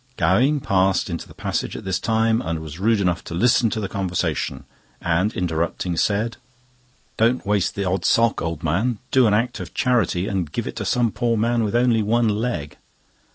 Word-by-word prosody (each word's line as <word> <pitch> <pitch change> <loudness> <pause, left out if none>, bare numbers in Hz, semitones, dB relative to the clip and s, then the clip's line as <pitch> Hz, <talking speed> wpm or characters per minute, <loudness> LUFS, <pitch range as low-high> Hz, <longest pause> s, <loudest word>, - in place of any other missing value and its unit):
Gowing 125 - +3
passed 95 -6 +1
into 85 - -5
the - - -15
passage - - -3
at - - -9
this 95 -1 -1
time 110 +1 +1
and 85 -6 -2
was 80 +1 -8
rude 110 +2 +2
enough 90 -3 0
to 85 - -6
listen 120 +4 +3
to 110 - -3
the 100 - -2
conversation, 90 -8 -2 0.4
and 90 +5 +1
interrupting, 85 -1 -2
said: 110 +6 0 0.8
"Don't 115 +3 +2
waste 100 -2 0
the 100 - -2
odd 95 -1 -1
sock, 115 +6 +3
old 80 0 -4
man; 100 +10 0
do 130 -3 +5
an 105 - +3
act 115 +3 -1
of - - -8
charity 115 -7 +1
and 95 -8 -2
give - - -3
it - - -5
to - - -3
some 120 -2 +1
poor 115 +1 0
man 115 +1 +1
with 105 +1 -1
only 120 -2 +3
one 115 +2 +2
leg." 105 -9 -2
105 Hz, 195 wpm, -22 LUFS, 90-115 Hz, 0.8 s, do